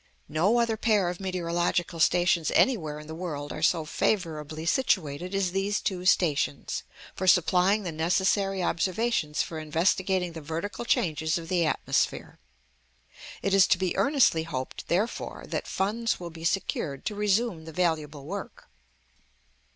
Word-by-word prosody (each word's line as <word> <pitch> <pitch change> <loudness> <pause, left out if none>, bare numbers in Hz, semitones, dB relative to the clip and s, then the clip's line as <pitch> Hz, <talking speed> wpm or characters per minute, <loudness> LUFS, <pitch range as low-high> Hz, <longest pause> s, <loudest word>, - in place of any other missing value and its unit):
No 180 +10 +2
other 230 -2 +1
pair 210 -5 +2
of 175 - -5
meteorological 175 -2 -1
stations 175 -1 +3
anywhere 160 - +2
in 150 - -10
the 160 - -8
world 155 -4 -5
are 155 - -6
so 165 -1 +2
favourably 155 -3 -2
situated 180 - 0
as 195 -2 +1
these 195 +2 0
two 185 -1 -2
stations, 150 -6 +1 0.3
for 190 - -3
supplying 185 +3 +4
the 175 - -3
necessary 190 +4 +1
observations 185 -3 0
for 160 - -6
investigating 180 +3 +1
the 160 - -7
vertical 165 +10 -4
changes 160 -5 +1
of 165 -1 -7
the 175 -3 +2
atmosphere. - - -1 1.0
It 195 - 0
is 195 -2 +6
to - - +4
be 185 -1 -1
earnestly 275 - +3
hoped, 140 -6 -5
therefore, 200 +7 -2
that - - -3
funds 215 +4 -1
will 175 -1 -7
be 165 0 -9
secured 160 -6 -1
to - - -1
resume 205 -4 0
the 160 - -8
valuable 155 -4 -1
work. 195 +5 -7
175 Hz, 145 wpm, -27 LUFS, 160-195 Hz, 1.0 s, is